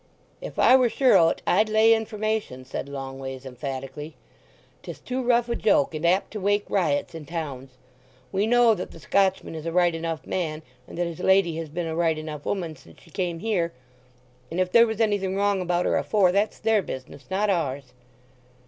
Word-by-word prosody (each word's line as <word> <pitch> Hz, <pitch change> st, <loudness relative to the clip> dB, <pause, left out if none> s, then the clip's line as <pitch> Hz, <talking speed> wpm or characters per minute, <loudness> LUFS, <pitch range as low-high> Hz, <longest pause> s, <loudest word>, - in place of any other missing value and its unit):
"If -, -, -8 dB
I 255 Hz, -, +6 dB
were 255 Hz, -2 st, +4 dB
sure 260 Hz, +2 st, +3 dB
o't 165 Hz, -, +3 dB
I'd 215 Hz, +4 st, +3 dB
lay 220 Hz, +1 st, +5 dB
information," 215 Hz, -, -2 dB
said 135 Hz, +1 st, -5 dB
Longways 135 Hz, -1 st, -7 dB
emphatically. 135 Hz, +3 st, -6 dB, 0.7 s
"'Tis -, -, -9 dB
too 255 Hz, +1 st, -3 dB
rough 240 Hz, -1 st, +2 dB
a 235 Hz, -, -1 dB
joke, 165 Hz, -10 st, +2 dB
and 155 Hz, +2 st, -1 dB
apt 185 Hz, +3 st, +1 dB
to 215 Hz, -, -5 dB
wake 205 Hz, +1 st, +1 dB
riots 165 Hz, -6 st, 0 dB
in 160 Hz, -2 st, -8 dB
towns. 135 Hz, -6 st, -6 dB, 0.5 s
We 200 Hz, +2 st, 0 dB
know 240 Hz, -1 st, +5 dB
that 180 Hz, -3 st, -5 dB
the -, -, -13 dB
Scotchman 190 Hz, +2 st, +1 dB
is 160 Hz, 0 st, -6 dB
a -, -, -1 dB
right 175 Hz, 0 st, +3 dB
enough 165 Hz, -1 st, -4 dB
man, 160 Hz, -4 st, -3 dB, 0.2 s
and -, -, -10 dB
that 175 Hz, -, 0 dB
his 170 Hz, 0 st, -6 dB
lady 190 Hz, -3 st, +3 dB
has 165 Hz, -2 st, -5 dB
been 170 Hz, +3 st, -3 dB
a 160 Hz, -1 st, -3 dB
right 165 Hz, -2 st, +1 dB
enough 155 Hz, -2 st, -7 dB
'oman 170 Hz, -6 st, -3 dB
since 135 Hz, -, -18 dB
she 165 Hz, -, -20 dB
came 175 Hz, 0 st, -2 dB
here, 180 Hz, -7 st, -1 dB, 0.8 s
and 170 Hz, -, -4 dB
if 185 Hz, 0 st, 0 dB
there 235 Hz, +3 st, +6 dB
was 220 Hz, -1 st, -4 dB
anything 200 Hz, -3 st, +1 dB
wrong 200 Hz, -1 st, +1 dB
about 175 Hz, 0 st, 0 dB
her -, -, +2 dB
afore, 195 Hz, -4 st, +2 dB
that's 200 Hz, +3 st, 0 dB
their 220 Hz, -2 st, +2 dB
business, 130 Hz, -3 st, -8 dB
not 200 Hz, +2 st, +1 dB
ours." 140 Hz, -7 st, -2 dB
175 Hz, 195 wpm, -25 LUFS, 155-205 Hz, 0.8 s, I